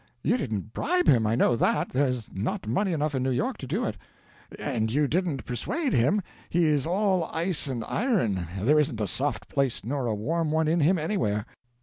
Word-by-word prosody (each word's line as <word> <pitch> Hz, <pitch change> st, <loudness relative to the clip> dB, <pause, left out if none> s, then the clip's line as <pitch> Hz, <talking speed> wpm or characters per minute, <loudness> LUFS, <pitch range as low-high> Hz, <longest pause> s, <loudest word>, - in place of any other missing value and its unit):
You -, -, +3 dB
didn't 110 Hz, -, -3 dB
bribe 360 Hz, +2 st, +1 dB
him, 115 Hz, -4 st, +5 dB
I 110 Hz, -, +2 dB
know 120 Hz, -, +3 dB
that; -, -, +1 dB
there's 125 Hz, -4 st, 0 dB
not 100 Hz, +3 st, -3 dB
money 185 Hz, -, +1 dB
enough 150 Hz, -2 st, -1 dB
in 130 Hz, -, 0 dB
New 130 Hz, -, 0 dB
York 125 Hz, -1 st, -1 dB
to -, -, -7 dB
do -, -, -1 dB
it. -, -, -3 dB, 0.6 s
And 110 Hz, -1 st, -1 dB
you 145 Hz, +3 st, +2 dB
didn't 160 Hz, -5 st, -1 dB
persuade 270 Hz, -, -2 dB
him; 185 Hz, -, +2 dB, 0.3 s
he 175 Hz, 0 st, +2 dB
is 150 Hz, -2 st, +2 dB
all 190 Hz, -1 st, +1 dB
ice 165 Hz, -1 st, -1 dB
and 125 Hz, -4 st, -3 dB
iron: 115 Hz, -, 0 dB
there 145 Hz, +10 st, +4 dB
isn't 135 Hz, -6 st, 0 dB
a 105 Hz, -, 0 dB
soft 135 Hz, +10 st, -1 dB
place 135 Hz, -6 st, -1 dB
nor 135 Hz, 0 st, -2 dB
a 110 Hz, -, 0 dB
warm 155 Hz, +9 st, -1 dB
one 160 Hz, 0 st, +1 dB
in 165 Hz, +2 st, +2 dB
him 170 Hz, +5 st, +4 dB
anywhere. 155 Hz, -, -1 dB
145 Hz, 205 wpm, -27 LUFS, 115-170 Hz, 0.6 s, him